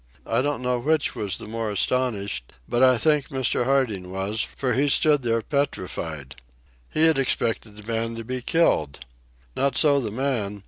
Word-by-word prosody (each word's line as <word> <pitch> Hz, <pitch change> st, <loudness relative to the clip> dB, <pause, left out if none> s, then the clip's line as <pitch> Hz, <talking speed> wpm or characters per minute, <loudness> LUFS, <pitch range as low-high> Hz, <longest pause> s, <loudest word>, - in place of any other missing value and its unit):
I -, -, +1 dB
don't 145 Hz, -1 st, -1 dB
know 125 Hz, 0 st, 0 dB
which 155 Hz, +3 st, +1 dB
was 100 Hz, -3 st, -3 dB
the -, -, -9 dB
more 110 Hz, 0 st, -3 dB
astonished, 100 Hz, -, -1 dB
but 120 Hz, -, 0 dB
I 130 Hz, -1 st, +6 dB
think 150 Hz, +2 st, +2 dB
Mr. 130 Hz, -2 st, 0 dB
Harding 120 Hz, -9 st, 0 dB
was, 95 Hz, +3 st, -2 dB
for 130 Hz, -3 st, -2 dB
he 140 Hz, +4 st, +2 dB
stood 145 Hz, 0 st, +4 dB
there 115 Hz, -2 st, 0 dB
petrified. 85 Hz, -, -3 dB, 0.5 s
He 160 Hz, -, +3 dB
had 160 Hz, -3 st, +4 dB
expected 115 Hz, -4 st, -1 dB
the 105 Hz, -, -10 dB
man 115 Hz, +1 st, -2 dB
to 115 Hz, -, -6 dB
be 130 Hz, +2 st, -4 dB
killed. 80 Hz, -, +1 dB, 0.5 s
Not 135 Hz, -1 st, 0 dB
so 145 Hz, -3 st, +4 dB
the 115 Hz, -5 st, -3 dB
man. 110 Hz, -4 st, -2 dB
120 Hz, 175 wpm, -24 LUFS, 105-135 Hz, 0.5 s, I